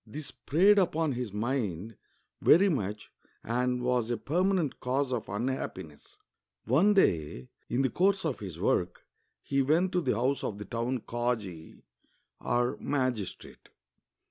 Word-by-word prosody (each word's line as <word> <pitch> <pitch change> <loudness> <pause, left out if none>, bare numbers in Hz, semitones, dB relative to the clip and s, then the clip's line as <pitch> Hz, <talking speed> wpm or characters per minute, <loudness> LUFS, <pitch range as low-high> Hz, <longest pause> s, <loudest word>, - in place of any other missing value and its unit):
This 150 +7 -6
preyed 195 +7 +4
upon 165 -4 +1
his 125 -4 -4
mind 110 -3 -2 0.5
very 195 +5 +6
much 105 - -3 0.3
and 125 +1 -1
was 125 -2 +1
a 120 - 0
pennanent 175 - 0
cause 130 +1 -1
of 120 - -3
unhappiness. 100 - -5 0.5
One 170 - +4
day, 75 - +1 0.2
in 125 +3 +1
the 130 - +1
course 190 - +2
of 150 -6 -2
his 95 -5 -7
work, - - 0 0.4
he 140 0 +1
went 165 +7 +2
to 180 - +1
the 155 - 0
house 130 +5 0
of 100 - -3
the 105 - -7
town 120 +4 -2
kazi 110 -10 -4 0.6
(or 120 +2 0
magistrate). 130 -8 -3
125 Hz, 140 wpm, -29 LUFS, 105-150 Hz, 0.6 s, very